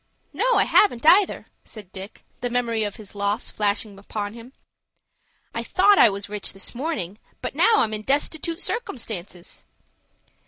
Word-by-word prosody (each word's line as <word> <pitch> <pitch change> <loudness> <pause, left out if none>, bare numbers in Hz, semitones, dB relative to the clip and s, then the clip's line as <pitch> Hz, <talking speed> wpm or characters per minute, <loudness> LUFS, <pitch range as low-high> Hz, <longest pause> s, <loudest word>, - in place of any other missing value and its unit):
No, - - +2
I - - +5
haven't, 300 - +3
either," 375 +4 +5 0.2
said 205 -5 -10
Dick, 195 +1 -9
the 245 - -2
memory 235 -2 0
of 205 -2 -3
his 215 -4 -11
loss 205 +2 -2
flashing 205 -1 -1
upon 205 0 -5
him. 235 +2 -12 1.0
"I - - -2
thought 400 +2 +4
I - - +8
was 200 0 -5
rich 210 0 -5
this 195 - -7
morning, 225 - -4 0.2
but - - -4
now 455 - +5
I'm 220 - +2
in 215 - -3
destitoot 310 +6 -1
circumstances." 220 - -5
220 Hz, 155 wpm, -24 LUFS, 205-290 Hz, 1.0 s, I